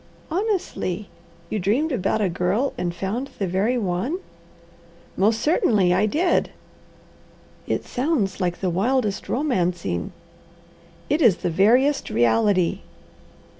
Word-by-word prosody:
"Honestly, 340 - -2 0.4
you 215 - -1
dreamed 235 - +1
about 215 -2 0
a 200 - +2
girl, 180 +9 0
and 175 - -2
found 215 +9 -3
the 200 - -1
very 195 +7 0
one?" 200 - -1 1.0
"Most 220 +3 +2
certainly, 210 - +3
I 215 - +2
did." 340 - +1 1.2
"It - - -2
sounds 245 - -1
like 175 -1 -1
the 185 -2 0
wildest 210 +3 0
romancing." 180 - -1 1.0
"It 300 +4 +1
is 225 - +5
the 175 - +1
veriest 245 - +3
reality." 120 - +2
205 Hz, 115 wpm, -23 LUFS, 180-265 Hz, 1.2 s, is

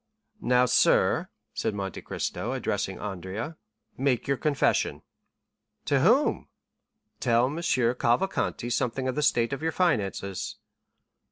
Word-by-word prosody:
"Now, 125 0 +4
sir," 125 - +3 0.2
said 105 - -2
Monte 95 -2 -4
Cristo, - - -3
addressing - - -2
Andrea, 100 - -5 0.4
"make 130 -3 +1
your 140 - +2
confession." 145 0 +1 0.8
"To - - +2
whom?" - - +3 0.7
"Tell 115 +2 +3
M. 145 +5 -3
Cavalcanti 120 0 +1
something 130 +2 -1
of 130 - 0
the 150 - -1
state 120 -4 +2
of 135 - -4
your 160 0 0
finances." 100 - -1
125 Hz, 115 wpm, -27 LUFS, 110-140 Hz, 0.8 s, Now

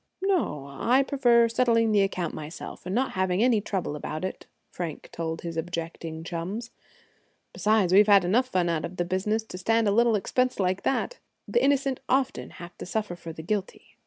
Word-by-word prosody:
"No, 335 - 0
I 240 - +2
prefer 240 -4 +4
settling 230 -1 +2
the 205 -1 +4
account 185 -3 -1
myself, 155 +3 -8
and 185 - -2
not 260 +2 +1
having 185 +2 +1
any 240 -4 +3
trouble 190 -7 -3
about 155 +3 -4
it," 190 - -6 0.2
Frank 170 -4 -6
told 165 -1 -4
his 165 -1 -5
objecting 165 -1 -5
chums. 185 +8 -5 0.8
"Besides, 210 -4 +2
we've 205 +2 +7
had 200 -3 +6
enough 235 +8 +2
fun 185 -8 +1
out 165 -2 0
of 180 - -6
the 175 - 0
business 195 +5 0
to 180 -4 -9
stand 225 +3 +2
a - - +3
little 230 +1 +4
expense 255 +5 0
like 185 0 +1
that. - - -1 0.3
The 475 - +1
innocent 275 -2 +2
often 260 0 0
have 175 0 -11
to - - -6
suffer 210 -2 -2
for 165 -1 -8
the 160 0 -9
guilty." 200 +2 -4
195 Hz, 190 wpm, -27 LUFS, 170-230 Hz, 0.8 s, we've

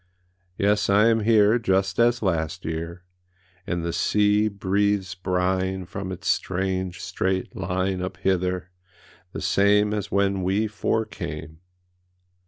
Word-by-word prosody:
Yes, 105 +1 +2
I 105 +3 +5
am 115 -1 +3
here 110 +1 +4
Just 95 -3 0
as 120 0 +3
last 85 -1 -1
year, 85 +2 -5 0.6
And 85 -2 -2
the 85 - -2
sea 105 +1 +2
breathes 100 -1 0
brine 95 0 -1
From 95 +1 -6
its 95 - -7
strange 95 -1 -1
straight 95 0 -2
line 95 0 -1
Up 90 - -4
hither, 90 -2 -1 0.6
the - - -6
same 105 +1 +3
As 105 -2 -3
when 100 -1 +1
we 95 +4 +1
four 110 +1 -1
came. 80 -6 -7
95 Hz, 130 wpm, -24 LUFS, 90-105 Hz, 0.6 s, I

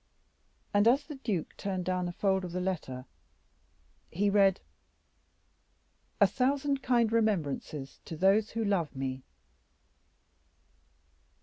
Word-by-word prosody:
And 205 +2 +4
as 270 +5 +4
the 300 - -7
duke 215 - -3
turned 185 -3 -3
down 180 -1 -1
a - - -3
fold 190 +1 0
of 175 -2 -6
the 180 - -1
letter, 155 -9 -3 1.0
he 200 +4 +1
read: 195 -2 +4 1.6
"A - - +8
thousand 275 +1 0
kind 240 -3 +2
remembrances 155 -10 -1
to 160 - -7
those 195 +5 +3
who 225 0 -2
love 185 -8 0
me." 130 0 -3
195 Hz, 115 wpm, -30 LUFS, 175-225 Hz, 1.6 s, A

